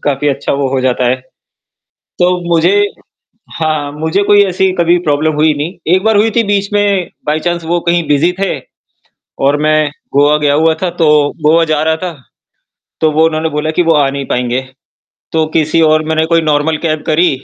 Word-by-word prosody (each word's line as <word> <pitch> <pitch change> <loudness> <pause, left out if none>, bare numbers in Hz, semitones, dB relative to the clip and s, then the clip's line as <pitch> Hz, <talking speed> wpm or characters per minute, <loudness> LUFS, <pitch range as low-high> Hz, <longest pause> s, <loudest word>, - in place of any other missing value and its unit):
काफ़ी 145 0 0
अच्छा 140 0 -2
वो 140 0 -1
हो 135 - 0
जाता 130 -1 0
है। 125 - +1 1.0
तो 180 0 +2 0.2
मुझे 170 +4 +3 0.9
हाँ, 150 -2 -1
मुझे 160 +6 -1
कोई 205 0 +4
ऐसी 190 0 0
कभी 170 +1 +3
प्रॉब्लम 150 +2 +1
हुई 155 +1 +2
नहीं, 150 +4 -4 0.2
एक 185 +2 0
बार 220 -1 +3
हुई 215 +2 +3
थी 235 - +4
बीच 200 0 -1
में 200 -3 0 0.2
बाय 150 +1 0
चाँस 175 0 -2
वो 170 +2 -1
कहीं 170 -2 +1
बिज़ी 150 +4 +2
थे 195 - -1 0.9
और 145 +1 +3
मैं 155 -1 +2 0.2
गोवा 145 +2 +4
गया 145 -1 +3
हुआ 160 +2 +2
था 185 - 0
तो 160 - +4 0.4
गोवा 165 +2 +4
जा 150 0 0
रहा 160 0 +1
था, 180 - -3 0.9
तो 155 - +3
वो 155 +2 +3
उन्होंने 160 0 -1
बोला 150 +1 -2
कि 175 +3 +1
वो 165 -1 +2
आ 140 -2 +2
नहीं 140 0 -5
पाएँगे।, 125 +1 -1 0.7
तो 160 -1 +1
किसी 160 +1 +2
और 155 0 +3
मैंने 160 0 0
कोई 165 0 +2
नॉर्मल 155 0 0
कैब 155 -1 -1
करी 165 +3 +3
160 Hz, 195 wpm, -13 LUFS, 150-175 Hz, 1.0 s, कोई